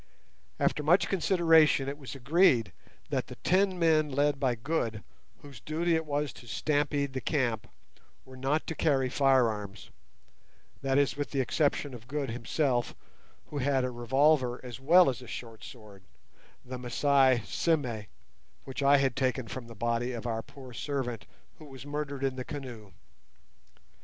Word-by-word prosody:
After - - +1
much 170 +6 +3
consideration 165 -6 +4
it 140 - -3
was 135 -1 -8
agreed 135 - +3 0.4
that - - -1
the - - -9
ten 190 +1 +2
men 160 -3 +3
led 145 +1 +1
by 130 -3 +1
Good, 115 -4 -2 0.4
whose 140 -5 -11
duty 165 - -1
it 160 -1 0
was 145 0 -1
to 120 - -14
stampede 145 +2 0
the 130 - -3
camp, 120 -6 -1 0.6
were 130 - -13
not 135 +4 -1
to - - -4
carry 135 -5 +1
firearms; 115 -8 +1 0.9
that 135 0 +1
is, 140 -1 +2
with 145 0 -3
the 140 - -2
exception 145 +1 0
of 120 -1 -11
Good 140 -2 -3
himself, 120 +1 -1 0.6
who 145 - -3
had 135 0 +1
a 125 - -1
revolver 125 +1 +2
as 125 0 -7
well 170 +6 +6
as 130 -1 -1
a 125 - -11
short 115 -1 -8
sword—the 105 +3 -13
Masai 130 0 +3
"sime" 125 - -1 0.6
which 135 +1 -6
I 140 +1 +6
had 135 -2 +1
taken 130 -2 -1
from 120 +3 -7
the 115 - -11
body 120 +3 -1
of 120 0 -6
our 115 -2 -2
poor 130 +1 -13
servant 120 -6 -4 0.3
who 155 - -11
was 135 -2 -11
murdered 145 -2 -4
in 135 -1 -1
the 130 - -3
canoe. 125 - -8
135 Hz, 155 wpm, -29 LUFS, 120-145 Hz, 0.9 s, well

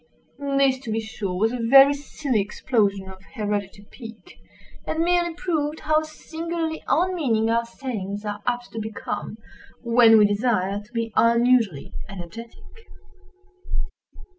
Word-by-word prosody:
This 270 -1 +3
to 240 -4 -6
be 220 - 0
sure 220 -4 -5
was 220 +4 +2
a 250 - -4
very 270 +4 +7
silly 280 -4 -2
explosion 200 -2 0
of 190 0 -11
hereditary 205 -2 -3
pique; 230 +8 -12 0.5
and 320 +1 0
merely 345 -1 +1
proved 315 -4 -2
how 310 0 +2
singularly 320 +1 -5
unmeaning 290 -12 +1
our 235 0 +1
sayings 215 -5 -5
are 205 0 -4
apt 245 0 -2
to 225 - -5
become, 215 0 -5 0.5
when 230 -1 +6
we 210 - +6
desire 205 -2 0
to 210 +3 -20
be 230 -2 -3
unusually 235 - +3 0.2
energetic. 200 +5 -9
230 Hz, 130 wpm, -24 LUFS, 210-275 Hz, 0.5 s, very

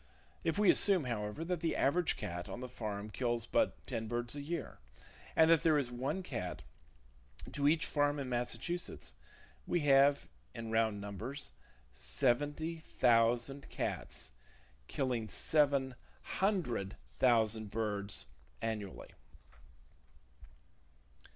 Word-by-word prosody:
If 165 - 0
we 205 -2 +6
assume, 195 -6 +4
however, 115 +4 -3
that 180 -1 -1
the 165 -1 0
average 170 +5 +2
cat 90 -8 -5
on - - -5
the 125 - -5
farm 105 -4 -5
kills 120 -1 -1
but - - 0
ten 110 0 -3
birds 120 +1 -2
per 145 - -4
year, 155 +1 -4 0.6
and 160 - +6
that 165 - +6
there 160 -2 +4
is 130 -4 -1
one 135 +10 -2
cat 90 - -4 0.9
to 145 -1 +1
each 160 +2 +4
farm 145 0 +1
in 140 -2 -3
Massachusetts, 125 - -3 0.5
we 175 - +1
have, 140 0 +5 0.3
in 115 -1 -5
round 110 -2 +2
numbers, 100 - -5 0.4
seventy 145 - 0
thousand 120 0 +2
cats, - - -4 0.6
killing 125 -5 -1
seven 140 -2 +2 0.3
hundred 165 - -1 0.2
thousand 110 -2 +3
birds 100 - -1 0.3
annually. 105 -4 -4
125 Hz, 120 wpm, -34 LUFS, 110-150 Hz, 0.9 s, we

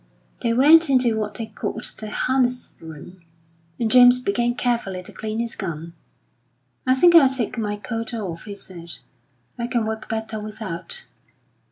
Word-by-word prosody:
They 235 - +1
went 300 +6 +6
into 250 -4 +3
what 210 -1 -3
they 230 - -4
called 220 - -5 0.2
the 215 -1 -6
harness 250 +2 0
room, 165 +3 -11 0.6
and 225 -2 0
James 245 0 +8
began 240 +1 0
carefully 230 -8 -1
to - - -11
clean 215 0 -4
his 235 0 -3
gun. 170 -4 -5 0.9
"I 255 - +5
think 345 +6 +5
I'll 305 -6 +8
take 260 -4 -2
my 210 -3 -2
coat 225 +2 -5
off," 190 -8 -5
he 205 -1 -7
said; 170 -4 -9 0.7
"I 235 - -1
can 240 -3 0
work 220 0 -5
better 220 -1 -3
without." 215 - -5
225 Hz, 160 wpm, -22 LUFS, 205-250 Hz, 0.9 s, James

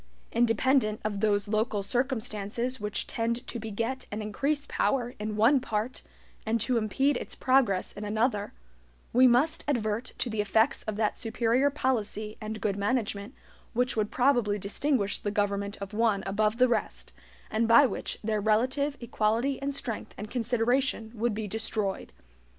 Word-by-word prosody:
Independent 235 -1 +2
of 205 -2 -1
those 205 -1 +1
local 215 -1 0
circumstances 240 0 -1
which 210 -1 -2
tend 235 +2 -2
to 240 - -5
beget 230 +4 -3
and 210 - -3
increase 280 +8 -1
power 245 -4 0
in 210 0 -3
one 235 +6 +5
part 225 0 -3 0.4
and 225 +1 0
to 245 +3 +1
impede 260 +5 +1
its - - -6
progress 255 -8 +2
in 205 - -7
another, 210 0 0 0.6
we 255 +2 +7
must 275 +7 +3
advert 230 -3 -1
to - - -1
the 220 -2 -1
effects 220 +6 +2
of 215 - -3
that 215 0 0
superior 235 +4 +2
policy 220 -6 -2
and 215 0 -5
good 200 -2 0
management 205 +1 -1 0.4
which 250 +2 +1
would 215 -1 0
probably 245 -6 +2
distinguish 205 +2 0
the 205 - -2
government 200 -1 -1
of 200 +1 -7
one 215 -3 +2
above 210 +3 +1
the 255 +1 +5
rest, 240 - -2 0.4
and 225 +1 +1
by 235 +5 +7
which 230 - -3
their 215 -1 0
relative 260 +7 +1
equality 235 +3 0
in 280 +1 -1
strength 250 -5 -4
and 210 +1 -7
consideration 245 0 0
would 230 -1 -1
be 215 -1 -3
destroyed. 215 -1 -2
225 Hz, 155 wpm, -28 LUFS, 210-255 Hz, 0.6 s, we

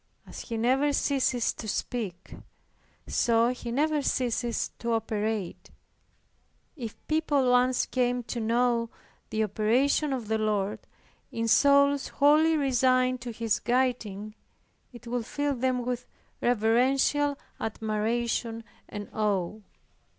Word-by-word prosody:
As - - -10
He 230 - -5
never 265 +5 +2
ceases 260 -4 +1
to 220 - -8
speak, 200 -5 -4 0.7
so 230 0 +2
He 245 -1 -5
never 300 +4 +1
ceases 240 -3 -1
to 235 0 -1
operate. 215 -3 -2 1.1
If 235 -8 -7
people 290 -5 +2
once 250 0 +3
came 245 -1 0
to 235 - -5
know 230 +1 +1 0.4
the 220 0 0
operations 250 +8 +1
of 235 -4 -6
the 220 0 0
Lord, 210 -2 -1 0.5
in 230 0 -2
souls 280 +3 +4
wholly 310 +3 +4
resigned 255 -2 +2
to 240 0 -5
His 225 -1 -1
guiding, 235 -5 -1 0.6
it 240 -1 -13
would 235 -1 -3
fill 290 0 -1
them 250 -1 -1
with 250 0 -3 0.3
reverential 260 +5 +2 0.2
admiration 225 +1 -2 0.3
and 205 -1 -6
awe. 205 -4 0
240 Hz, 115 wpm, -28 LUFS, 220-260 Hz, 1.1 s, souls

